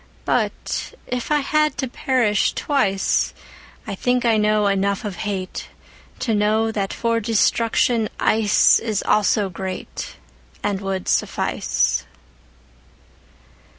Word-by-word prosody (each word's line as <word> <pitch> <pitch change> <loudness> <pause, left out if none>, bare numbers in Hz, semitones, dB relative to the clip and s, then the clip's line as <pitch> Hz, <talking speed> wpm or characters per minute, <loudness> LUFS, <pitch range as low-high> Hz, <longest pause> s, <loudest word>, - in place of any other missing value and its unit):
But - - -2
if 245 -1 -4
it 300 -1 +2
had 305 +1 +1
to 265 - -2
perish 240 -4 +1
twice,I 200 -7 -2
think 245 +5 0
I 230 -1 +4
know 210 0 +2
enough 200 +2 0
of 200 -3 -5
hateTo 205 +3 -5
know 215 +2 +2
that 200 -3 -2
for 230 -1 0
destruction 230 0 +2
iceIs 215 0 +3
also 210 0 +3
greatAnd 180 - -6
would 195 -1 -3
suffice. 65 - 0
210 Hz, 95 wpm, -21 LUFS, 195-230 Hz, -, I